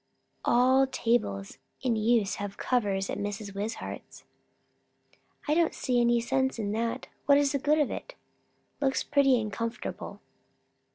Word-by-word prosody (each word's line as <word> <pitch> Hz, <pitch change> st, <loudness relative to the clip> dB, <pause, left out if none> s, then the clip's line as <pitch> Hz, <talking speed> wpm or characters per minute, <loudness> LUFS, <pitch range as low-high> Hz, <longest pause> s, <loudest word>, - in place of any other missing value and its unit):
All 260 Hz, +2 st, +4 dB
tables 225 Hz, -, -1 dB, 0.2 s
in 245 Hz, -3 st, +2 dB
use 220 Hz, -2 st, +2 dB
have 205 Hz, -1 st, -5 dB
covers, 200 Hz, -6 st, 0 dB
at -, -, -4 dB
Mrs. 205 Hz, 0 st, -4 dB
Wishart's." 210 Hz, +3 st, -6 dB, 1.2 s
"I 295 Hz, -, +3 dB
don't 330 Hz, 0 st, +2 dB
see 245 Hz, -2 st, +1 dB
any 240 Hz, 0 st, +3 dB
sense 265 Hz, +2 st, 0 dB
in 205 Hz, -2 st, -2 dB
that. 230 Hz, +2 st, -2 dB, 0.2 s
What's 280 Hz, -1 st, +5 dB
the 280 Hz, -, 0 dB
good 300 Hz, +3 st, +2 dB
of 295 Hz, -3 st, +1 dB
it?" -, -, -7 dB, 0.7 s
"Looks 270 Hz, -1 st, +1 dB
pretty 275 Hz, -3 st, +3 dB
and 215 Hz, -2 st, -4 dB
comfortable." 230 Hz, +2 st, -5 dB
240 Hz, 135 wpm, -28 LUFS, 210-270 Hz, 1.2 s, What's